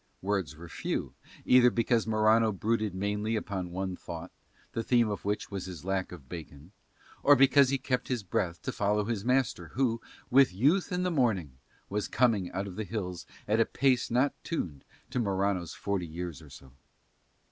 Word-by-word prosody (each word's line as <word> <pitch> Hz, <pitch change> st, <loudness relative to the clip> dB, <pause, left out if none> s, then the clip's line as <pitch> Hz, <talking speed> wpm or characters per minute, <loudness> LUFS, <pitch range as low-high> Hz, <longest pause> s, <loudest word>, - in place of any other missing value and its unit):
Words 95 Hz, -7 st, -1 dB
were 85 Hz, +1 st, -10 dB
few, -, -, -3 dB, 0.3 s
either 125 Hz, -1 st, +7 dB
because 115 Hz, -1 st, +1 dB
Morano 110 Hz, +1 st, +4 dB
brooded 105 Hz, 0 st, -1 dB
mainly 105 Hz, +3 st, -1 dB
upon 95 Hz, -4 st, -3 dB
one 95 Hz, +1 st, -3 dB
thought, 85 Hz, 0 st, -8 dB, 0.4 s
the 115 Hz, -, -2 dB
theme 120 Hz, 0 st, +3 dB
of 100 Hz, -, -4 dB
which 105 Hz, +1 st, -2 dB
was 100 Hz, -2 st, -4 dB
his 90 Hz, -3 st, -8 dB
lack 95 Hz, -1 st, -1 dB
of 80 Hz, -7 st, -11 dB
bacon, 80 Hz, 0 st, -9 dB, 0.5 s
or 145 Hz, -, +7 dB
because 135 Hz, 0 st, +6 dB
he 135 Hz, -, +1 dB
kept 130 Hz, -1 st, -1 dB
his 125 Hz, -5 st, -2 dB
breath 90 Hz, -2 st, -1 dB
to -, -, -2 dB
follow 105 Hz, +1 st, +1 dB
his 110 Hz, -3 st, -2 dB
master 130 Hz, +2 st, +1 dB
who, 120 Hz, -3 st, +1 dB, 0.3 s
with 130 Hz, -7 st, +5 dB
youth 150 Hz, -, +2 dB
and 180 Hz, 0 st, 0 dB
the 180 Hz, -, +1 dB
morning, 110 Hz, -, +1 dB, 0.4 s
was 105 Hz, +1 st, -2 dB
coming 110 Hz, -7 st, +2 dB
out 95 Hz, +2 st, -2 dB
of 95 Hz, -2 st, -8 dB
the 110 Hz, -, -1 dB
hills 90 Hz, -5 st, -5 dB, 0.2 s
at 110 Hz, +2 st, +2 dB
a 115 Hz, -, +5 dB
pace 130 Hz, -2 st, +2 dB
not 125 Hz, +4 st, +2 dB
tuned 80 Hz, -, -4 dB, 0.3 s
to -, -, -1 dB
Morano's 100 Hz, -5 st, 0 dB
forty 100 Hz, -4 st, -2 dB
years 85 Hz, 0 st, -6 dB
or 75 Hz, -, -14 dB
so. 65 Hz, -1 st, -14 dB
105 Hz, 180 wpm, -30 LUFS, 90-120 Hz, 0.5 s, either